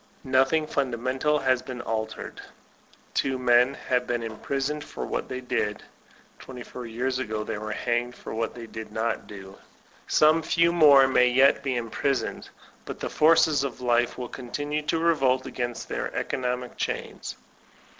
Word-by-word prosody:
Nothing 135 +4 +3
fundamental 130 +2 0
has 130 -3 +2
been 130 -2 -7
altered. 110 -1 -4 0.7
Two 135 -1 0
men 125 +1 +4
have 125 -2 -1
been 120 -1 -1
imprisoned 135 +6 -3
for - - -6
what - - -3
they 130 0 -4
did 105 -4 -2 0.6
(twenty 125 -2 -9
four 125 -1 -8
years 125 +3 -2
ago 110 -4 -3
they 110 -1 -4
were 110 0 -5
hanged 120 +2 -1
for - - -8
what 115 +1 -2
they 120 -1 -8
did 110 -1 -8
not 110 +2 -2
do); 95 -1 -11 0.5
some 155 +2 +4
few 170 +1 +2
more 145 -5 +7
may 125 -1 +4
yet 135 +3 +4
be 135 -2 -1
imprisoned. 120 +2 -2 0.3
But - - -7
the - - -4
forces 155 -2 +4
of 135 -3 -4
life 120 -1 +1
will 125 - -4
continue 145 +6 -4
to - - +1
revolt 135 -6 +2
against 120 -1 -4
their - - -3
economic 125 -1 -3
chains. - - -4
125 Hz, 155 wpm, -26 LUFS, 120-140 Hz, 0.7 s, more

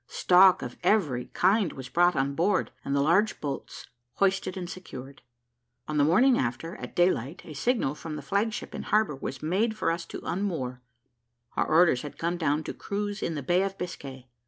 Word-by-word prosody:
Stock 185 +5 +5
of - - -7
every 165 - +2
kind 195 -1 +2
was 130 -1 -8
brought 175 +5 +3
on 140 0 0
board, 185 +6 +1
and 140 - -1
the 140 - +3
large 190 +8 +2
boats 140 -2 -5 0.3
hoisted 195 -1 +1
and 180 -2 -4
secured. 140 -8 -9 0.7
On 155 - -2
the - - +5
morning 240 - +4
after, 130 +7 -3
at 125 - -9
day 175 +1 +5
light, 135 +10 -5
a 155 - -9
signal 225 - 0
from 155 0 -7
the 150 - -7
flag 200 +9 0
ship 230 - -6
in - - -4
harbour 215 -8 +1
was 135 0 -6
made 210 +7 0
for 190 - +1
us 170 0 -4
to - - -7
unmoor; 160 -9 -3 0.7
our - - +1
orders 160 -6 +4
had 145 - -8
come 170 +1 -1
down 155 -2 0
to - - -5
cruise 205 0 -4
in 165 - -2
the 145 - -4
Bay 175 +7 +2
of 195 0 -2
Biscay. 135 -7 -7
170 Hz, 200 wpm, -27 LUFS, 140-195 Hz, 0.7 s, Stock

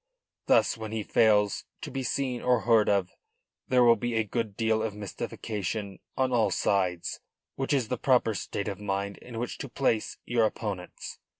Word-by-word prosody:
Thus - - +4
when 110 -1 -5
he 110 -1 -2
fails 105 -2 +3 0.2
to - - -6
be 135 0 -2
seen 130 -1 -1
or 125 -2 +3
heard 115 -2 +4
of 100 -3 +2 0.6
there 125 -1 +4
will 120 -1 +7
be 120 +1 -2
a 110 - +3
good 110 -1 -3
deal 110 -1 +2
of 110 -2 -2
mystification 105 -1 -4 0.2
on 130 -1 +2
all 115 -3 +3
sides, 90 -3 0 0.4
which 135 +1 -2
is 130 -6 +1
the 125 - -2
proper 125 -4 +3
state 100 0 -4
of 100 -1 -4
mind 100 -1 -2
in 120 -2 -9
which 120 +1 -4
to 140 - -5
place 115 -3 0
your 120 -2 +3
opponents. 100 -5 -6
110 Hz, 180 wpm, -28 LUFS, 100-120 Hz, 0.6 s, will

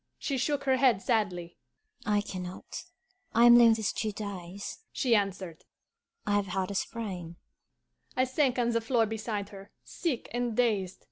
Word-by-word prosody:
She 275 -3 -2
shook 290 +3 0
her 265 -1 +3
head 250 -6 +4
sadly. 180 -6 -1 0.5
'I 210 0 +3
can 185 -2 -6
not. 180 +1 -7 0.5
I 235 +1 +7
am 240 0 +9
lame 235 -2 +7
these 220 -2 -1
two 215 - -2
days,' 200 -2 -6
she 250 -3 +1
answered. 190 -5 -2 0.6
'I 205 - 0
have 200 -1 0
had 185 +1 -2
a - - -3
sprain.' 190 -5 -4 0.8
I 255 - +4
sank 260 0 +1
on 240 -1 +2
the 230 0 +1
floor 225 0 +2
beside 215 -2 -3
her, 195 0 -11
sick 315 -10 -3
and 240 -2 -1
dazed. 205 -7 +1
215 Hz, 165 wpm, -29 LUFS, 195-240 Hz, 0.8 s, am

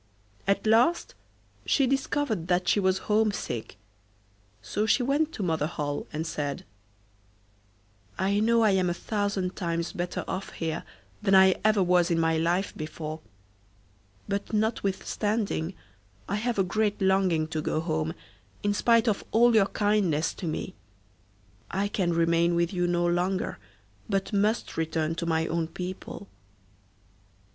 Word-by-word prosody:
At 200 +2 +1
last 235 +10 +3 0.5
she 275 - +2
discovered 265 - -1
that 180 0 +1
she - - +3
was 190 -1 +1
homesick, 210 - 0 0.8
so 210 - -2
she 250 - +3
went 290 +5 +1
to 205 - -4
Mother 160 -4 0
Holle 145 -3 -4
and 155 +1 -3
said: 145 -4 -3 1.5
'I 200 +2 +1
know 230 +1 +3
I 215 - +5
am 185 -2 +2
a 175 - -1
thousand 200 -2 -2
times 170 -1 -2
better 175 0 -3
off 190 +1 -4
here 160 -2 -3 0.4
than 195 -2 +3
I 190 0 +7
ever 215 -2 +4
was 180 0 +3
in 170 -1 +1
my 165 0 +2
life 175 +4 0
before, 155 0 -6 1.1
but 200 0 -3
notwithstanding, 210 -3 -1 0.5
I 200 - -1
have 235 +1 -1
a 195 - +4
great 210 +2 0
longing 190 -5 +2
to 160 -1 -2
go 155 - -1
home, 160 -1 -2 0.5
in 205 0 +2
spite 230 +2 +3
of 210 -3 +1
all 235 +2 +5
your 210 -3 +5
kindness 200 -8 +1
to 175 - -6
me. 155 - -3 1.0
I 195 +2 0
can 185 -4 0
remain 170 +1 +2
with 170 +2 +1
you 175 -1 +1
no 175 0 +1
longer, 175 - 0 0.5
but 195 0 -1
must 210 +3 0
return 160 0 -1
to 170 +1 -4
my 160 -1 +1
own 165 0 -1
people. 185 +3 -7
190 Hz, 145 wpm, -27 LUFS, 165-210 Hz, 1.5 s, I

